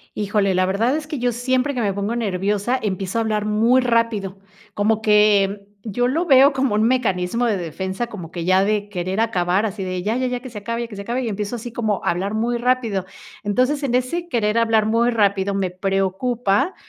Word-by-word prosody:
Híjole, 200 -2 0
la 185 - +2
verdad 225 +9 +1
es 310 -1 -5
que 300 -5 -5
yo 245 0 +1
siempre 255 +3 0
que 250 - -3
me 200 -3 0
pongo 200 +4 -2
nerviosa, 205 +2 0
empiezo 195 +1 -2
a - - +2
hablar 215 -2 -1
muy 225 +5 +3
rápido, 230 -5 0 0.4
como 215 +1 +1
que 205 -2 +3 0.2
yo 245 +3 -1
lo 330 +6 0
veo 275 -1 +6
como 265 -5 0
un 215 - +2
mecanismo 230 -2 +1
de 215 -3 +1
defensa, 190 +6 -4
como 180 -7 -8
que 170 -1 -5
ya 185 +2 +4
de 205 0 -1
querer 185 +1 -3
acabar, 190 -2 +1
así 200 -2 -3
de 185 -1 -3
ya, 215 +4 -1
ya, 255 - 0
ya, 250 -1 -2
que 255 - -9
se 215 - -7
acabe, 230 +3 -4
que 210 - -10
se 200 - -6
acabe, 240 +5 -2
y 235 - -2
empiezo 210 +3 -3
así 235 +1 -7
como 220 -3 -1
a - - +2
hablar 195 +5 -2
muy 235 +2 0
rápido. 235 -6 0 0.4
Entonces, 255 +8 +1
en 255 -3 -1
ese 295 +8 -1
querer 230 -6 +1
hablar 225 -2 +3
muy 230 +2 +2
rápido 200 -3 +1
me 190 -2 -1
preocupa 195 - 0
215 Hz, 215 wpm, -21 LUFS, 195-240 Hz, 0.4 s, veo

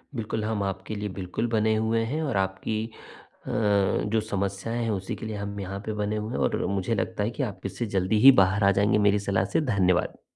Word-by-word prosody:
बिल्कुल, 110 -1 -3
हम 110 -2 -1
आपके 95 +2 -4
लिए 105 0 -3
बिल्कुल 95 +5 -2
बने 110 -1 +2
हुए 110 +1 +1
हैं 145 +7 -2
और 135 -9 -1
आपकी 95 +3 -1 0.6
अ, - - -4 0.6
जो 110 +2 +1
समस्याएँ 100 +2 -3
हैं, 115 - -1
उसी 95 -2 -3
के - - -8
लिए 110 -1 -4
हम 100 0 -5
यहाँ 95 0 -5
पे 110 - -2
बने 105 +1 -1
हुए 105 +1 -4
हैं - - -2
और 65 - 0
मुझे 100 +3 -1
लगता 105 0 -2
है 105 - 0
कि 140 - 0
आप 105 -7 -5
इससे 100 +5 -3
जल्दी 95 +3 +2
ही 135 - +12
बाहर 95 +2 +2
आ 100 - +6
जाएँगे, 100 +2 +3
मेरी 105 0 +4
सलाह 100 -2 0
से। - - +4
धन्यवाद। 90 -2 +1
105 Hz, 225 wpm, -26 LUFS, 95-110 Hz, 0.6 s, ही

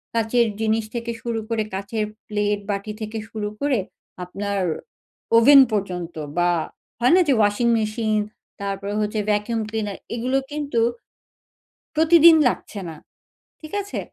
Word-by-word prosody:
কাচের 230 +1 +2
জিনিস 220 0 +1
থেকে 235 0 -3
শুরু 235 -2 -2
করে 225 -2 0
কাচের 200 +3 -2 0.2
প্লেট, 205 -1 0
বাটি 200 +1 -3
থেকে 215 +1 -4
শুরু 210 -1 -4
করে 280 -5 +1 0.5
আপনার 200 +2 -3 0.8
ওভেন 275 +5 +8
পর্যন্ত 180 -5 -3 0.2
বা, 175 0 +3 0.5
হয় 245 +6 +4
না? 370 - +6
যে 280 - +4
ওয়াশিং 205 +3 +2
মেশিন, 215 0 0 0.4
তারপরে 200 0 -3
হচ্ছে 210 +1 -1
ভ্যাকুম 210 +2 0
ক্লিনার 215 -3 -3 0.2
এগুলো 250 +3 0
কিন্তু 290 -5 -2 1.2
প্রতিদিন 325 +1 +7
লাগছে 220 -3 -3
না। 160 - -8 0.7
ঠিক 310 -1 -11
আছে? 405 - -5
220 Hz, 130 wpm, -22 LUFS, 205-240 Hz, 1.2 s, ওভেন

